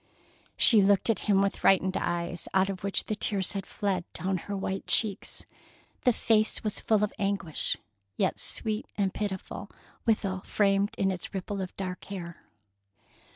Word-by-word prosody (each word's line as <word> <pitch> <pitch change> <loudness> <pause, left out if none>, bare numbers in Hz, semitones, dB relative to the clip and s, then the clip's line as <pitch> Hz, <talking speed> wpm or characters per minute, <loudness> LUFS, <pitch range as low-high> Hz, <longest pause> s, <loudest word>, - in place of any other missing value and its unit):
She 220 -4 +7
looked 200 +3 +4
at 225 - -2
him 195 -1 +5
with 200 - 0
frightened 190 0 +4
eyes, 175 0 -2
out 190 +1 +4
of 190 -1 -5
which 200 -1 0
the 215 - -2
tears 200 -2 +1
had 195 -2 -4
fled 195 -3 -1
down 190 0 -1
her 200 +3 -5
white 190 0 -3
cheeks. 210 -4 +1 0.6
The 250 - +7
face 220 -1 +2
was 215 -2 -1
full 215 -2 +2
of 210 - 0
anguish, 195 -6 -1 0.4
yet - - +1
sweet 215 0 -3
and 195 -2 +1
pitiful 200 0 -4 0.4
withal, 195 -4 +1
framed 200 +1 +1
in 195 0 +2
its 185 +1 -6
ripple 195 +1 -3
of 185 - -6
dark 185 -2 -5
hair. 175 -4 -8
195 Hz, 160 wpm, -29 LUFS, 190-205 Hz, 0.6 s, She